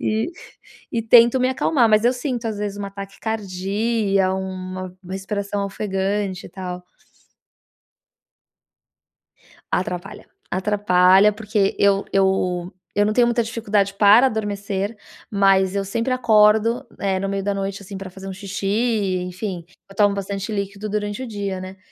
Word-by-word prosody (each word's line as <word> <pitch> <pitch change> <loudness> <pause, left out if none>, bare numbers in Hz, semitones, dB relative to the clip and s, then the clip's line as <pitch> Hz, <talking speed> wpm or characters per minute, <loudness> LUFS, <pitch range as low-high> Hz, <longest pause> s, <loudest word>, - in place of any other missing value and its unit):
E 220 +8 0 0.6
e 230 -1 0
tento 235 +2 +6
me 255 - +3
acalmar, 260 -2 +2
mas 215 +1 +4
eu 245 - +5
sinto 245 -2 -3
às 215 -2 -3
vezes 205 -1 -4
uma 200 -1 -5
taquicardia, 195 0 -1
uma 185 -1 -5
respiração 200 +1 -3
ofegante 195 -1 -2
e - - -11
tal. 180 -1 -6 2.9
Atrapalha, 180 +1 -3 0.2
atrapalha 190 0 +4
porque 210 -2 0
eu 200 0 +3
eu 185 -2 +1 0.2
eu 205 +1 +3
não 215 - 0
tenho 245 -1 +4
muita 235 0 +2
dificuldade 210 -3 0
para 210 +5 +6
adormecer, 205 -2 -2 0.4
mas 195 -2 +3
eu 200 - 0
sempre 230 +6 -2
acordo, 220 -1 +3
eh, 195 -1 0
no 195 - -2
meio 195 0 -2
da 200 +1 -1
noite, 195 0 -3
assim, 195 0 -8
para 190 -1 -7
fazer 195 +1 -9
um 190 - -5
xixi 195 0 -5
e 205 -3 +1
enfim, 180 -1 -5 0.2
eu 195 - -15
tomo 205 -1 +4
bastante 200 +2 -4
líquido 200 +1 -4
durante 205 +2 -2
o 260 - -4
dia, 200 -3 -4
né. 185 +1 -8
200 Hz, 145 wpm, -21 LUFS, 190-215 Hz, 2.9 s, tento